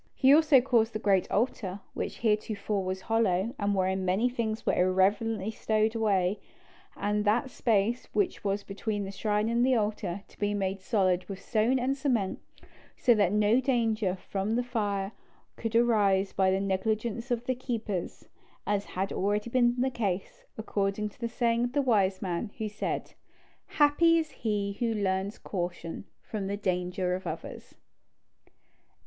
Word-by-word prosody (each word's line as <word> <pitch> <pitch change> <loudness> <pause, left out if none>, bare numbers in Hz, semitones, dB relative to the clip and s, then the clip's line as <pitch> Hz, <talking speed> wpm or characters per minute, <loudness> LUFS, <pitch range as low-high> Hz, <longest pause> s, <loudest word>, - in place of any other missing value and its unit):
He 270 0 +6
also 300 -4 +6
caused 235 -3 +2
the - - -1
great 195 -3 +2
altar, 205 -4 -1
which - - -5
heretofore 210 -2 0
was 185 0 -3
hollow, 225 -1 +1
and 200 0 +1
wherein 190 0 0
many 190 +7 +2
things 230 -3 -3
were - - +2
irreverently 195 +3 +2
stowed 220 0 +1
away, 205 -4 +1 0.6
and 210 +1 0
that 235 +5 +1
space 230 +1 +1
which 205 -3 0
was 200 0 -1
between 205 +1 -3
the 195 - -5
shrine 210 +1 0
and 235 +1 +2
the 260 0 +4
altar, 205 -4 -2
to - - -22
be 205 0 0
made 195 -1 -2
solid 185 -3 +1
with 195 -1 -5
stone 225 +5 +1
and 260 +2 0
cement, 250 -9 0 0.6
so 245 - +4
that 205 -5 +2
no 210 +3 +3
danger 225 -7 +1
from 200 +4 -2
fire 205 -5 -2 0.4
could 225 0 -4
arise 205 -5 +3
by 190 -1 +3
the 190 +1 +2
negligence 215 +5 -1
of 240 -1 -1
the 255 - +1
keepers, 225 -7 -4 0.4
as 205 -1 0
had 190 +1 -3
been - - -5
already 205 +4 0 0.3
the 260 +2 +1
case; 235 - -3
according 210 -1 -1
to 210 - -24
the 235 - -1
saying 235 0 +1
of 245 +1 -2
the 285 - +2
wise 200 -6 +2
man, 180 +3 -2
who 220 -2 -2
said, 210 0 -4 0.5
"Happy 320 +3 +4
is 315 -2 -1
he 205 -3 -2
who 230 -2 0
learns 195 0 -1
caution 175 -1 -5 0.2
from 205 -3 -4
the 200 +1 -2
danger 180 -1 -1
of 185 +1 -4
others." - - -7
210 Hz, 160 wpm, -29 LUFS, 195-235 Hz, 0.6 s, He